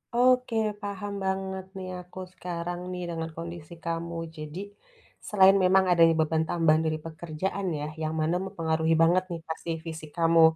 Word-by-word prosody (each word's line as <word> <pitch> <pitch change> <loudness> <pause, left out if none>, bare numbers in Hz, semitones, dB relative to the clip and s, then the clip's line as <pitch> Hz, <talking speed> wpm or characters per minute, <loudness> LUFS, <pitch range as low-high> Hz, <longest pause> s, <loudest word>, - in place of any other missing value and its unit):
Oke, 250 -1 +4 0.3
paham 205 0 -4
banget, 190 0 -2
nih, 185 -1 -5
aku 180 +1 -11
sekarang 175 0 -4
nih, 180 0 -4
dengan 165 -1 -3
kondisi 170 -1 -7
kamu. 170 0 -3 0.2
Jadi, 155 +3 -6 0.7
selain 195 -1 +6
memang 190 +1 +5
adanya 165 -1 +6
beban 160 0 +2
tambahan 160 -2 +4
dari 155 0 0
pekerjaan, 170 +4 -3
ya, 150 - -3
yang 155 0 -1
mana 160 +3 +1
mempengaruhi 160 -4 0
banget, 175 +3 +5
nih, 170 - -3
pasti, 160 +1 -5 0.2
fisik 160 -2 -7
kamu. 165 0 +5
170 Hz, 155 wpm, -28 LUFS, 160-190 Hz, 0.7 s, selain